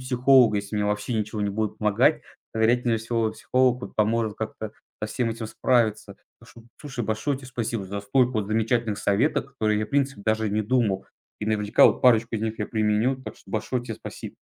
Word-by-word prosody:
психологу, 125 -3 +4
если 100 +1 -3
мне 105 - 0
вообще 105 +3 -1
ничего 105 0 -2
не 105 -1 0
будет 105 +1 -3
помогать. 105 -2 +3 0.3
То, 110 - -3
вероятнее 120 0 +2
всего, 115 -1 -1
психолог 125 -1 +1
вот - - -8
поможет 110 0 +1
как-то 110 -1 -5 0.3
со 105 - 0
всем 120 -3 -1
этим 115 0 -5
справиться. 110 -1 0 0.2
Так - - -17
что, 115 - -15 0.2
слушай, 135 -6 -5
большое 110 +6 -1
тебе 130 -1 -11
спасибо 115 -4 -3
за 100 +2 -5
столько 125 +5 +2
вот 105 -2 -1
замечательных 110 0 0
советов, 105 +10 +1
о - - -20
которых 110 -6 0
я, 105 - -2
в - - -23
принципе, 135 -6 0
даже 110 0 +1
не 110 +1 0
думал. 105 -4 0 0.3
И 105 - -3
наверняка 105 0 +3
вот - - +1
парочку 115 -2 +4
из 105 - -4
них 110 0 -3
я 105 - -2
применю. 110 +4 +1
Так 110 - -8
что - - -18
большое 120 +3 -2
тебе 115 -2 -6
спасиб - - -9
110 Hz, 210 wpm, -25 LUFS, 105-120 Hz, 0.3 s, психологу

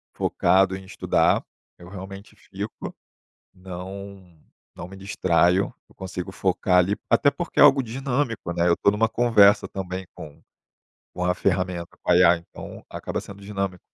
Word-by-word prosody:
focado 95 0 +2
em 95 - -9
estudar, - - +1 0.3
eu 85 - -13
realmente 95 +1 -10
fico, - - -7 0.6
não 95 -1 -10 0.4
não - - -8
me 95 +1 -12
distraio, 95 -1 +1 0.2
eu - - -23
consigo 95 0 -6
focar 95 -1 +1
ali, 95 +3 +2
até 145 - +4
porque 170 +4 -5
é - - +9
algo 140 -2 +6
dinâmico, 125 -4 -2
né, 85 0 +1
eu 85 - +4
tô - - +3
numa 110 +2 +2
conversa 105 -4 +4
também 95 -1 -5
com 80 -4 -11 0.7
com 90 - -3
a 90 - +2
ferramenta, 90 -2 -2
com - - 0
a - - +6
IA 90 -1 +6
então 85 - -11
acaba - - -4
sendo 100 0 -12
dinâmico. 100 -2 -4
95 Hz, 155 wpm, -24 LUFS, 90-100 Hz, 0.7 s, é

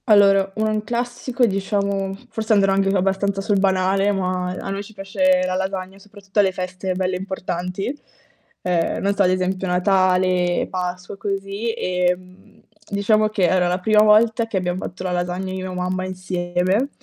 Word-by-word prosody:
Allora 195 -2 +5
un 215 -1 0
classico 245 +2 -1
diciamo, 195 -1 -1 0.2
forse 220 0 0
andrò 195 -2 +4
anche 195 0 +2
abbastanza 195 +1 0
sul 200 0 +1
banale, 195 +1 +2
ma 185 -2 -1
a - - -6
noi 195 0 -3
ci 220 - -14
piace 275 +8 +1
la 185 - -1
lasagna, 190 0 -3
soprattutto 200 0 -5
alle 195 -2 +4
feste 185 +1 -4
belle 185 0 -1
importanti. 185 +4 -4 0.7
Ehm, 175 -2 0
non 200 +1 +2
so 200 - 0
ad 180 - +3
esempio 185 +1 -1
Natale, 180 -1 +2
Pasqua, 180 +1 -4
così, 200 +3 -3
ehm, 180 0 -3 0.3
diciamo 215 +1 +2
che 215 -3 -1
era 180 -1 +2
la 180 +1 0
prima 210 +3 +4
volta 220 +2 +4
che 220 - -2
abbiam 180 -1 -1
fatto 180 0 -6
la 185 - -2
lasagna 180 +1 -2
io 190 - -4
e - - -3
mia 180 0 -4
mamma 185 +1 -2
insieme. 185 +5 -1
195 Hz, 165 wpm, -21 LUFS, 185-205 Hz, 0.7 s, Allora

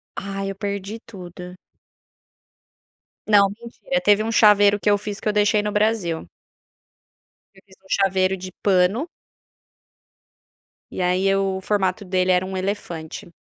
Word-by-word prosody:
Aí, 195 0 -5
eu 195 - -5
perdi 200 +2 -5
tudo. 180 -3 -10 1.7
Não, 200 -2 +5
mentira. 235 +5 -5
Teve 205 +1 +4
um 225 - -2
chaveiro 205 -2 +5
que 210 - +1
eu 205 - +4
fiz 205 -1 -6
que - - -6
eu - - 0
deixei 210 0 +3
no 210 0 -3
Brasil. 210 -6 0 1.3
Eu 190 - -20
fiz 190 -1 -20
um - - -21
chaveiro 190 -1 +1
de 185 0 -8
pano 195 - +2 1.8
e, - - -8
aí, 185 +2 +2
o 195 -1 -1
formato 195 0 -1
dele 185 0 +1
era 180 0 +2
um 190 0 -6
elefante. 175 -5 -5
195 Hz, 140 wpm, -22 LUFS, 185-210 Hz, 1.8 s, Não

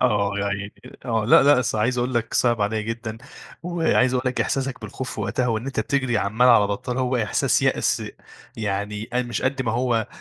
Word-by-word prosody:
آه 105 -5 +2
يا 100 - -1
عيني 100 +1 -4 0.3
آه، 115 -4 0
لأ 120 - +6
لأ 140 -1 +5
أصل 110 -3 -1
عايز 120 +4 +1
أقول 125 +1 -1
لك 115 -1 -1
صِعب 120 -3 +2
عليَّ 105 +1 0
جدًا، 115 0 -5 0.4
وعايز 165 -7 +1
أقول 125 - 0
لك 125 - -3
إحساسك 135 -1 -2
بالخوف 120 +4 -6
في - - -5
وقتها 125 - -1
وإن 115 +1 -1
أنت 135 -5 -2
بتجري 130 -1 0
عمّال 110 +6 +2
على 115 -4 +6
بطّال 105 +5 -3
هو 130 0 0
إحساس 110 -4 +1
يأس - - +1 0.5
يعني، 105 0 -3
أ 125 +1 +1
مش 120 -3 -4
قدّ 130 +1 0
ما 115 -3 -1
هو 120 -2 0
120 Hz, 205 wpm, -23 LUFS, 110-125 Hz, 0.5 s, لأ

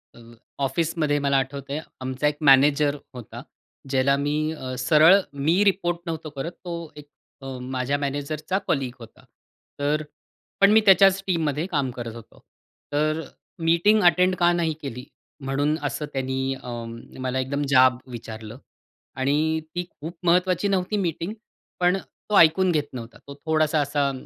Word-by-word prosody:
अ, - - -15 0.4
ऑफिसमध्ये 155 0 0
मला 140 -1 +2
आठवतंय, 140 +2 -3 0.2
आमचा 130 +3 -1
एक 150 0 -1
मॅनेजर 145 +2 +5 0.2
होता. 120 -1 -9 0.5
ज्याला 135 +1 +3
मी 145 +1 -1 0.2
अ, 130 -4 -6
सरळ 155 +7 +6 0.2
मी 160 +8 +2
रिपोर्ट 185 -4 +1
नव्हतो 160 -2 -5
करत. 145 +3 -5
तो 170 -3 -8
एक 150 -1 -12 0.3
अ, 135 -1 -6
माझ्या 130 +2 -2
मॅनेजरचा 145 +5 -3
कलीग 130 -4 -1
होता. 115 - -14 0.6
तर 150 +2 0 0.6
पण 200 - +7
मी 220 +1 +6
त्याच्याच 195 0 +6
टीममध्ये 160 -4 0
काम 140 -5 0
करत 120 -2 -7
होतो. 115 -2 -14 0.5
तर 155 +2 +1 0.4
मीटिंग 170 +7 +4
अटेंड 180 +1 +4
का 175 -1 +3
नाही 165 -2 0
केली? 125 -3 -6 0.4
म्हणून 145 +3 0
असं 145 +1 -2
त्यांनी 130 0 -1
अ, - - -8 0.5
मला 130 0 -2
एकदम 140 +2 -2
जाब 130 -2 +5
विचारला 110 -1 -8 0.6
आणि 150 +4 +1 0.2
ती 175 0 -2
खूप 165 +3 -9
महत्त्वाची 180 +2 +2
नव्हती 195 +1 0
मीटिंग. 175 0 -2 0.5
पण 180 +1 +3
अ, - - -5 0.3
तो 210 - +3
ऐकून 175 +3 +5
घेत 150 -3 0
नव्हता. 115 -2 -8
तो 140 - -8
थोडासा 155 -1 +2
असा 140 -1 0
150 Hz, 150 wpm, -24 LUFS, 135-170 Hz, 0.6 s, पण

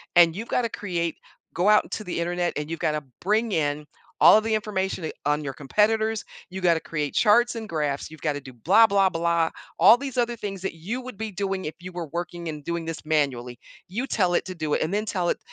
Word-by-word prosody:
and 170 -1 +6
you've 225 +4 -5
gotta 235 -2 +1
create 170 -6 -3 0.4
go 180 +4 +1
out 210 0 +6
into 215 - -6
the 180 - -4
internet 175 +1 -1
and 150 +1 -4
you've 165 -1 -4
gotta 150 -1 -1 0.2
bring 215 +4 +1
in 150 -3 0 0.4
all - - +9
of 220 - +1
the 225 - 0
information, 190 -4 -2
eh, - - -3
on 150 +1 +1
your 135 - -3
competitors, 220 +9 +1 0.3
you 190 +1 -6
gotta 170 -2 +3
create 150 -3 -3
charts 235 +2 +4
and 220 -1 -5
graphs, 150 -4 -2
you've 155 - -12
gotta 150 -2 -1
do 130 -2 -12
blah, 190 - +5
blah, 195 -1 +3
blah, 170 -1 +1 0.3
all 220 +4 +8
these 270 -1 -6
other 240 0 +1
things 195 -3 -5
that 190 - -4
you 205 +11 -4
would 255 -4 -9
be 220 0 -4
doing 195 0 -3
if 155 - -4
you 185 - -8
were 175 -2 -5
working 175 0 -4
and 150 -2 -6
doing 170 +1 -3
this 165 -1 -5
manually. 130 -6 0 0.3
You 235 +8 -2
tell 185 -8 +1
it - - +1
to 185 -1 -6
do 155 -2 -2
it - - -1
and 160 +5 -1
then 210 +1 0
tell 180 -4 -1
it - - 0
175 Hz, 235 wpm, -25 LUFS, 160-210 Hz, 0.4 s, all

